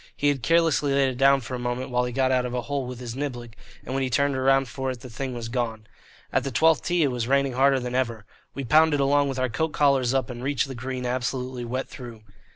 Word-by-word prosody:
He 145 - +2
had 140 -3 -1
carelessly 165 -1 +2
laid 135 -1 +3
it 125 - -5
down 135 0 +5
for 125 - -8
a 125 - -3
moment 120 +2 -3
while 125 0 +1
he 125 - -4
got 130 +1 +1
out 130 -1 +2
of 125 - -5
a 125 - -2
hole 140 0 -3
with 125 -1 -7
his 120 -2 -6
niblick, 120 -5 -5 0.3
and - - -5
when 135 - 0
he 130 - 0
turned 140 +2 +1
round 135 0 +3
for 135 +2 -4
it 125 -2 -5
the 130 - -10
thing 130 +2 -4
was 115 -1 -5
gone. 115 -3 -3 0.5
At - - +2
the 135 - -2
twelfth 155 +2 +3
tee 175 -2 +2
it 140 - +1
was 120 -2 -2
raining 140 0 +2
harder 135 +1 +3
than 125 0 -5
ever. 115 -4 -1 0.3
We 140 - -4
pounded 155 +2 +4
along 140 +1 +3
with 135 - -4
our 130 0 +1
coat 160 +6 -2
collars 135 -4 +3
up 135 -1 0
and 120 0 -8
reached 140 0 0
the 135 - -6
green 125 +1 -5
absolutely 125 0 -3
wet 130 +3 -3
through. 120 -4 -10
130 Hz, 265 wpm, -25 LUFS, 125-140 Hz, 0.5 s, down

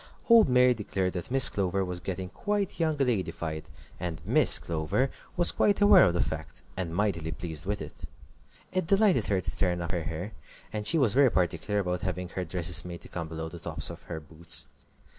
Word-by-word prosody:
Old 230 -9 +7
Mary 125 0 +5
declared 95 -4 -2
that 90 +1 -5
Miss 135 0 +7
Clover 95 -1 -1
was 90 -1 -4
getting 90 0 -5
quite 205 - -2
young 160 -2 +1
ladyfied, 85 - -2 0.3
and 85 -2 -4
"Miss - - +6
Clover" 85 - -1 0.3
was 175 - +4
quite 205 - +2
aware 205 0 +7
of 85 -3 +1
the - - +2
fact, - - -6
and 85 -3 -4
mightily 90 -5 -1
pleased 80 -1 -5
with 105 -5 -2
it. 75 - -10 0.7
It 185 -3 -1
delighted 195 - +3
her 100 -2 +1
to - - -5
turn 90 -2 0
up 85 -1 -4
her 85 -3 -3
hair; 80 +6 -5 0.4
and 105 -1 -2
she 165 - +5
was 130 -9 +2
very 135 0 +5
particular 95 +2 0
about 90 -1 -2
having 90 -1 -4
her 90 - -4
dresses 90 0 0
made 85 -1 -8
to - - -13
come 85 -2 -5
below 80 0 -5
the 85 +1 -9
tops 80 -1 -3
of 85 - -11
her 80 -2 -4
boots. 80 +2 -3
90 Hz, 200 wpm, -28 LUFS, 85-120 Hz, 0.7 s, Old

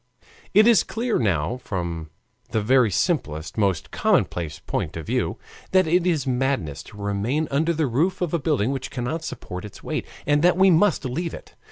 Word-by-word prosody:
It 215 +1 +8
is 235 -2 +6
clear 235 +1 -1
now 95 0 0
from 85 -8 -4 0.4
the 110 - 0
very 125 0 +4
simplest, 80 - -1
most 100 -6 0
commonplace 80 -4 0
point - - -3
of 80 - -6
view, - - -1 0.4
that 185 -1 +5
it 175 +2 +2
is 160 -7 +1
madness 125 - -1
to 105 - -13
remain 105 +10 -1
under 155 +4 +2
the 160 -2 0
roof 155 +10 0
of 175 -3 -2
a 170 - +2
building 135 -5 +1
which 135 -1 -4
cannot 135 +6 -3
support 90 - -6
its 105 - -11
weight, - - -3 0.2
and 145 0 +3
that 175 +1 +4
we 190 0 +6
must 170 -2 +3
leave 165 +7 -3
it. - - -13
135 Hz, 185 wpm, -24 LUFS, 100-165 Hz, 0.4 s, It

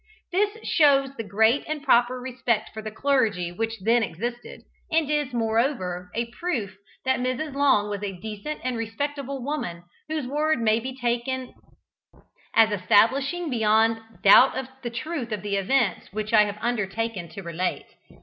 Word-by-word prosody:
This 415 +4 0
shows 275 -3 +4
the 225 - -4
great 220 +6 +2
and 305 -2 -4
proper 250 -2 +3
respect 245 -3 -2
for 220 - -6
the 215 - -5
clergy 220 -8 +1
which 225 +5 -3
then 230 +4 +3
existed, 235 +5 -5 0.3
and 320 -2 +2
is, 295 -3 0
moreover, 225 -6 -1
a 235 0 -2
proof 235 - -2 0.3
that 260 -1 +2
Mrs. 255 +4 -2
Long 275 -7 +3
was 205 -1 -4
a 195 -3 -5
decent 220 +9 -6
and 255 -1 -2
respectable 275 +4 -4
woman, 240 - -4 0.3
whose 310 -4 -2
word 300 +4 +1
may 220 -1 +3
be 260 +2 -6
taken 250 +1 -2 1.0
as 220 -1 +6
establishing 265 - +2
beyond 225 -1 +3 0.2
doubt 255 +7 +7 0.2
the 240 - -3
truth 240 +1 -4
of 210 -2 -3
the 205 -1 -1
events 200 +1 0
which 215 +2 -4
I 210 -1 +7
have 205 0 -5
undertaken 220 -4 -2
to 195 - -7
relate. 170 +2 -2
235 Hz, 155 wpm, -25 LUFS, 210-275 Hz, 1.0 s, doubt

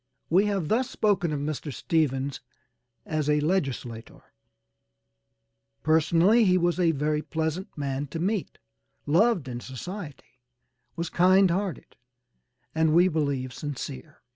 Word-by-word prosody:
We 195 +5 +4
have 195 -6 -1
thus 240 +7 +1
spoken 195 -6 +1
of 150 - -2
Mr. 145 0 -4
Stephens 140 -2 -1 0.6
as 155 -2 -1
a 150 0 +3
legislator; 135 -8 -3 1.6
personally, 165 +8 +4
he 185 -3 +4
was 175 0 +1
a 175 -2 +4
very 150 0 0
pleasant 160 +5 -3
man 140 0 -3
to 140 - -6
meet, 195 +3 -2 0.5
loved 175 - +3
in 120 -1 -5
society, 135 - -9 0.6
was 170 0 -4
kind 185 +1 +5
hearted, 185 -4 -3 0.8
and 160 -1 +2
we 180 +2 +6
believe 140 -5 -1
sincere. 145 +1 -7
160 Hz, 120 wpm, -26 LUFS, 140-185 Hz, 1.6 s, we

